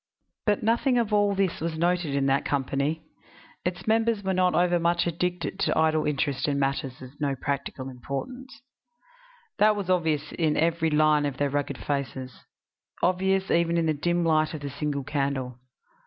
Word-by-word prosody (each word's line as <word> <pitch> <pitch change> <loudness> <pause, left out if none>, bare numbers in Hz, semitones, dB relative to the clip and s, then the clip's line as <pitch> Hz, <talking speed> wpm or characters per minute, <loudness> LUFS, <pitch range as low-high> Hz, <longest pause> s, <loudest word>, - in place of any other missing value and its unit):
But 210 0 +2
nothing 235 +3 +2
of 225 -3 0
all 205 -1 +3
this 195 -2 0
was 165 -1 -2
noted 175 -3 +1
in 140 -1 +1
that 135 0 +2
company; 140 +3 -1 0.6
its 180 0 -3
members 225 -1 +2
were 190 0 0
not 185 -1 +2
overmuch 175 -1 +2
addicted 175 +1 -2
to - - +1
idle 155 -1 +2
interest 140 -1 0
in 145 -1 0
matters 135 -1 -2
of 130 +4 -13
no 140 -2 0
practical 140 -1 -4
importance; 220 - -7 1.0
that 210 0 +5
was 195 -3 -2
obvious 160 -4 0
in 155 -3 0
every 165 0 +2
line 150 -1 +3
of 135 -2 -5
their 145 -1 0
rugged 145 0 -2
faces 130 -3 -4 0.6
obvious 190 +1 +1
even 170 0 +2
in 165 - +2
the 155 - +2
dim 175 +3 0
light 155 -1 +2
of 150 - -7
the 140 -1 -5
single 140 0 -3
candle. 135 -3 -2
160 Hz, 170 wpm, -26 LUFS, 140-180 Hz, 1.0 s, that